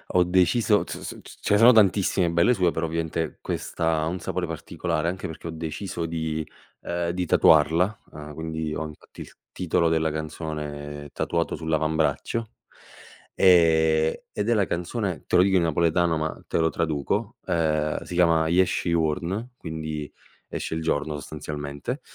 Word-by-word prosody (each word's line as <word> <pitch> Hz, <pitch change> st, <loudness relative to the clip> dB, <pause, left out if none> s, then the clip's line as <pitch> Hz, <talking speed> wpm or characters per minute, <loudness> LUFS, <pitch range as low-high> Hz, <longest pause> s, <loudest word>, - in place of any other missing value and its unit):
ho 90 Hz, -, +6 dB
deciso 95 Hz, +4 st, +3 dB
t -, -, -10 dB
s -, -, -4 dB
s -, -, -7 dB
s -, -, -13 dB
ce -, -, +1 dB
ne 105 Hz, -, +5 dB
sono 120 Hz, +2 st, +9 dB
tantissime 100 Hz, -4 st, +3 dB
belle 85 Hz, +9 st, +4 dB
sue 90 Hz, -5 st, +2 dB
però 80 Hz, 0 st, -2 dB
ovviamente 80 Hz, 0 st, -3 dB
questa 80 Hz, -1 st, -1 dB
ha 80 Hz, -, 0 dB
un 90 Hz, +2 st, -3 dB
sapore 90 Hz, +2 st, -2 dB
particolare 80 Hz, -1 st, -3 dB
anche 90 Hz, +2 st, -3 dB
perché 80 Hz, +1 st, -8 dB
ho -, -, -4 dB
deciso 80 Hz, +2 st, -4 dB
di 80 Hz, -1 st, -3 dB, 0.4 s
ehm, 85 Hz, -1 st, -2 dB
di 90 Hz, +1 st, -2 dB
tatuarla, 90 Hz, +5 st, +4 dB
uhm, 75 Hz, 0 st, -9 dB
quindi 80 Hz, 0 st, -4 dB
ho -, -, -3 dB
anche 75 Hz, -1 st, -11 dB
il -, -, -9 dB, 0.2 s
titolo 85 Hz, -2 st, +1 dB
della 80 Hz, -1 st, +1 dB
canzone 75 Hz, -2 st, -5 dB
tatuato 85 Hz, -1 st, -1 dB
sull'avambraccio, 80 Hz, +7 st, -1 dB, 0.8 s
ehm, 80 Hz, -3 st, +5 dB, 0.2 s
ed 105 Hz, +2 st, -1 dB
è -, -, +4 dB
la 105 Hz, -4 st, +2 dB
canzone 90 Hz, 0 st, -3 dB
te -, -, 0 dB
lo 90 Hz, -, +7 dB
dico 95 Hz, 0 st, +2 dB
in 85 Hz, -, +3 dB
napoletano 85 Hz, +1 st, +2 dB
ma 80 Hz, 0 st, -4 dB
te -, -, -1 dB
lo 80 Hz, 0 st, +3 dB
traduco, 75 Hz, -4 st, -2 dB
ehm, 75 Hz, -2 st, 0 dB
si -, -, -8 dB
chiama 85 Hz, -2 st, +4 dB
Jesce 90 Hz, +1 st, +2 dB
juorno, 85 Hz, +8 st, -1 dB
quindi 80 Hz, -, -5 dB, 0.4 s
esce -, -, -4 dB
il 80 Hz, -, -3 dB
giorno 75 Hz, -1 st, -1 dB
sostanzialmente, 75 Hz, -, -5 dB
80 Hz, 165 wpm, -25 LUFS, 80-90 Hz, 0.8 s, sono